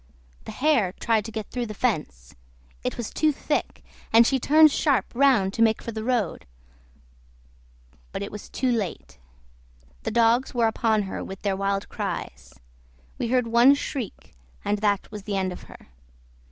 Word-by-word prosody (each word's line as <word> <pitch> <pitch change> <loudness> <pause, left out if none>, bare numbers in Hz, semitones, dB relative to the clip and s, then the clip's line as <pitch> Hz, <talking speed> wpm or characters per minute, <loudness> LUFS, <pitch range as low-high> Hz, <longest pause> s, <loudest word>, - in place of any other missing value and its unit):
The - - -6
hare 235 -6 +2
tried 220 -1 0
to 225 - -6
get 215 -1 -6
through 245 -1 -3
the 215 - -7
fence; 150 - -2 0.5
it - - -3
was 240 -3 -5
too 310 -1 +2
thick, 280 - -3 0.3
and 230 +1 +7
she 265 +2 +2
turned 310 +4 +6
sharp 275 -8 +2
round 240 -7 +3
to 230 - -2
make 220 -1 +4
for 230 - -6
the 220 -1 -5
road, 235 - -1 1.6
but - - -4
it 200 - -6
was 210 - -9
too 260 -1 0
late; 195 - -4 0.8
the - - -3
dogs 235 +3 +2
were 235 -1 +3
upon 220 -1 +1
her 190 - -5
with 195 0 -9
their 200 -2 0
wild 195 0 -1
cries; - - -6 0.6
we - - -1
heard 250 0 +2
one 235 +4 +6
shriek, 270 -5 -6 0.3
and 205 0 0
that 205 -1 0
was 210 -1 -7
the 205 -2 -2
end 190 -1 -1
of - - -11
her. - - -15
225 Hz, 170 wpm, -25 LUFS, 200-250 Hz, 1.6 s, and